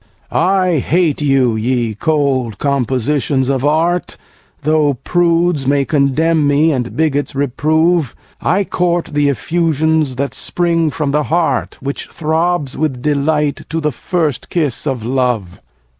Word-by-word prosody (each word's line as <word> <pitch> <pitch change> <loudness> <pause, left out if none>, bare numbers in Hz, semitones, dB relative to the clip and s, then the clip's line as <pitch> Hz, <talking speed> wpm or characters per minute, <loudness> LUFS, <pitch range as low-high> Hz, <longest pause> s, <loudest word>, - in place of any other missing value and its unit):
4. - - -1
I 185 -2 +2
hate 160 +1 +1
you, 135 -5 +2
ye 120 0 -1
cold 135 -4 0
compositions 135 0 0
of 135 -2 0
art, 165 +4 0 0.5
Though 150 -1 +2
prudes 170 -1 +1
may 140 0 +2
condemn 150 +2 +2
me, 145 +3 +3
and 125 -4 -3
bigots 145 -3 0
reprove; 155 +2 +1 0.3
I 195 +3 +1
court 175 -3 -1
the 145 -1 +2
effusions 160 -1 0
that 140 +2 -2
spring 170 -2 0
from 150 -2 -2
the 150 +1 +1
heart, 160 -5 0
Which 140 +1 -4
throbs, 160 -2 -1
with 135 -5 -2
delight, 150 0 0
to 165 - -2
the 150 -1 0
first 155 -1 -2
kiss 150 -5 -1
of 125 -5 -2
love. 125 -7 -1
150 Hz, 135 wpm, -16 LUFS, 135-165 Hz, 0.5 s, me